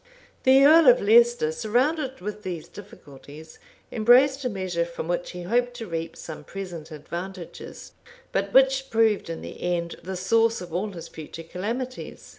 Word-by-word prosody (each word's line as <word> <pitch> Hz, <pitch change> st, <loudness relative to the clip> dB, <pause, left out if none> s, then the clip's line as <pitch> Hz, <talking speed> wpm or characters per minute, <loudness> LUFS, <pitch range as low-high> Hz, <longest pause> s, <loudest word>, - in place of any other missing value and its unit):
The 265 Hz, +1 st, +7 dB
earl 320 Hz, +1 st, +7 dB
of 250 Hz, 0 st, +7 dB
Leicester, 235 Hz, -5 st, +4 dB
surrounded 260 Hz, -, -1 dB
with 210 Hz, +2 st, -6 dB
these 175 Hz, -5 st, -6 dB
difficulties, 155 Hz, -5 st, -13 dB, 0.3 s
embraced 260 Hz, +5 st, +4 dB
a 250 Hz, -, 0 dB
measure, 185 Hz, -5 st, -2 dB
from 170 Hz, -1 st, -6 dB
which 175 Hz, 0 st, -2 dB
he 180 Hz, -1 st, -7 dB
hoped 245 Hz, +6 st, 0 dB
to 235 Hz, -2 st, -6 dB
reap 165 Hz, -3 st, -5 dB
some 160 Hz, -, -8 dB
present 175 Hz, -5 st, -8 dB
advantages, 170 Hz, +4 st, -8 dB, 0.4 s
but -, -, -1 dB
which 270 Hz, 0 st, +4 dB
proved 220 Hz, -5 st, +2 dB
in 165 Hz, -, -5 dB
the -, -, -9 dB
end 170 Hz, -1 st, -2 dB
the 190 Hz, +1 st, -5 dB
source 225 Hz, +5 st, +2 dB
of 175 Hz, -2 st, -9 dB
all 190 Hz, +5 st, -1 dB
his 175 Hz, -4 st, -9 dB
future 160 Hz, +1 st, -9 dB
calamities. 230 Hz, +10 st, -6 dB
195 Hz, 160 wpm, -25 LUFS, 170-245 Hz, 0.4 s, The